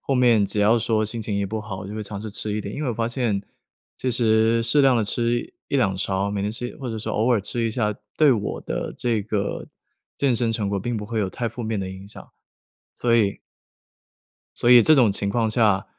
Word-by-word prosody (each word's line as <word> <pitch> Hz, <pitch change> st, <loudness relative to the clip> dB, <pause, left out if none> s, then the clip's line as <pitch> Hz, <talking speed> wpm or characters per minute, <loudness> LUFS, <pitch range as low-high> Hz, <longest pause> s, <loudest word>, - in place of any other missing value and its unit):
后 135 Hz, -, -1 dB
面 120 Hz, -5 st, +4 dB
只 100 Hz, +1 st, -1 dB
要 110 Hz, +3 st, +4 dB
说 110 Hz, -1 st, 0 dB
心 115 Hz, +2 st, -3 dB
情 105 Hz, -1 st, -3 dB
一 100 Hz, 0 st, -1 dB
不 110 Hz, +3 st, -4 dB
好， 100 Hz, -2 st, -7 dB
就 100 Hz, -, -7 dB
会 110 Hz, -, -4 dB
尝 100 Hz, -1 st, -6 dB
试 110 Hz, 0 st, -6 dB
吃 105 Hz, +1 st, -3 dB
一 105 Hz, -, -1 dB
点， 100 Hz, 0 st, -6 dB
因 150 Hz, -, -4 dB
为 135 Hz, -, -1 dB
我 -, -, -3 dB
发 115 Hz, +1 st, -1 dB
现 120 Hz, -5 st, -1 dB, 0.5 s
其 130 Hz, -, -2 dB
实 115 Hz, -1 st, +3 dB
适 130 Hz, +5 st, +3 dB
量 135 Hz, -2 st, +5 dB
地 115 Hz, -, +2 dB
吃 120 Hz, +3 st, 0 dB, 0.3 s
1，2 105 Hz, -9 st, +1 dB
勺， 95 Hz, +1 st, -1 dB
每 100 Hz, -1 st, -2 dB
天 105 Hz, +1 st, -2 dB
吃 120 Hz, +2 st, -5 dB
或 130 Hz, -3 st, -5 dB
者 110 Hz, -, -4 dB
是 110 Hz, -, -6 dB
偶 115 Hz, +4 st, +1 dB
尔 115 Hz, -, +2 dB
吃 115 Hz, +4 st, -3 dB
一 -, -, -1 dB
下， 110 Hz, -2 st, 0 dB, 0.3 s
对 155 Hz, -2 st, +6 dB
我 105 Hz, -3 st, -3 dB
的 -, -, -4 dB
这 115 Hz, -3 st, 0 dB
个 100 Hz, -1 st, -3 dB, 0.5 s
健 135 Hz, -4 st, +2 dB
身 115 Hz, -1 st, +1 dB
成 110 Hz, -3 st, -2 dB
果 100 Hz, 0 st, -1 dB
并 120 Hz, +5 st, -3 dB
不 105 Hz, -1 st, -5 dB
会 115 Hz, +1 st, -3 dB
有 100 Hz, -3 st, -1 dB
太 120 Hz, +3 st, -3 dB
负 120 Hz, +2 st, -7 dB
面 110 Hz, -2 st, -2 dB
的 95 Hz, -, -4 dB
影 95 Hz, +1 st, -9 dB
响， 100 Hz, -, -13 dB, 0.7 s
所 120 Hz, -1 st, +1 dB
以 105 Hz, -4 st, +1 dB, 1.2 s
所 120 Hz, -, +2 dB
以， 120 Hz, -1 st, +9 dB
这 155 Hz, -, +6 dB
种 125 Hz, -7 st, +5 dB
情 100 Hz, 0 st, -1 dB
况 110 Hz, +1 st, 0 dB
下， 105 Hz, -4 st, +2 dB
110 Hz, 255 characters per minute, -23 LUFS, 100-120 Hz, 1.2 s, 以